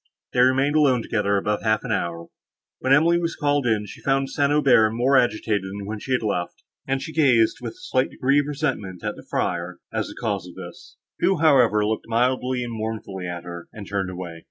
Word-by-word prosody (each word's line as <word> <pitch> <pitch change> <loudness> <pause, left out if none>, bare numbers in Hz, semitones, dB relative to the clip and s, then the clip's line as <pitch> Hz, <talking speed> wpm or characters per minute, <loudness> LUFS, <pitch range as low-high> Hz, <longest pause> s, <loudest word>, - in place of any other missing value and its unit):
They 125 - 0
remained 135 +4 +3
alone 135 -6 +3
together 100 -3 0
above 105 +1 -1
half 110 -1 +1
an 125 - -4
hour; 85 -5 -2 0.5
when 130 - -1
Emily 165 +5 +5
was 170 -1 -2
called 145 -3 +1
in, 110 -2 +1
she 100 - -11
found 135 0 0
St. 140 -1 +1
Aubert 130 -7 +4
more 125 +4 +2
agitated 110 -4 +2
than 100 +1 -7
when 105 +1 -5
she 130 - -3
had 125 - +1
left 90 -5 -3 0.2
him, 135 - 0
and 135 - -1
she 160 - -7
gazed, 125 -9 +3
with 115 -2 -5
a - - -22
slight 130 0 0
degree 140 +3 +2
of 145 - -1
resentment, 130 - -3
at - - -2
the - - -11
friar, 85 +1 -2 0.2
as - - -1
the - - -11
cause 100 -6 -2
of 90 - -12
this; - - -11 0.2
who, 190 - +2
however, 125 -9 +4
looked 110 +1 -2
mildly 125 +2 0
and 120 -1 -5
mournfully 110 -4 -5
at 85 -1 -5
her, 85 -1 -8
and 100 -3 -9
turned 95 -2 -2
away. 90 -2 -7
115 Hz, 220 wpm, -23 LUFS, 100-135 Hz, 0.5 s, Emily